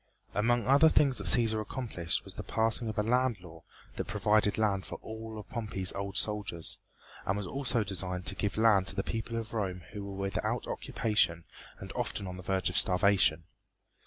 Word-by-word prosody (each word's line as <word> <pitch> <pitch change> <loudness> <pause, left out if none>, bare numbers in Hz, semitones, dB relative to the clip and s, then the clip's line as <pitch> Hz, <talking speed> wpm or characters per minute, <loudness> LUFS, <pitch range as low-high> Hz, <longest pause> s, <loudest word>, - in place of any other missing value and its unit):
Among 120 +3 +1
other 140 +5 +6
things 140 -4 +3
that - - -5
Cæsar 110 -3 +6
accomplished 110 -6 -3
was - - -7
the - - -6
passing 115 +1 0
of 110 - -6
a 105 - +2
land 125 -1 +1
law 80 -2 -12 0.4
that - - -2
provided 105 +1 +2
land 100 -3 +1
for - - -7
all 110 0 -7
of 105 - -9
Pompey's 105 -5 -3
old 100 +1 -3
soldiers, 105 -6 -2 0.4
and 95 - -1
was 105 - -3
also 125 +1 -1
designed 90 -2 -3
to - - +6
give 105 0 -2
land 105 -4 +4
to - - +5
the 100 - -1
people 115 +1 -4
at 115 0 -7
Rome 95 -5 -3
who 105 -2 -5
were 100 -1 -7
without 100 -1 -2
occupation 90 -7 0 0.3
and - - -9
often 100 - -3
on 90 -1 -6
the - - -8
verge 95 -1 0
of 90 - -2
starvation. 90 -5 +3
105 Hz, 190 wpm, -30 LUFS, 95-115 Hz, 0.4 s, other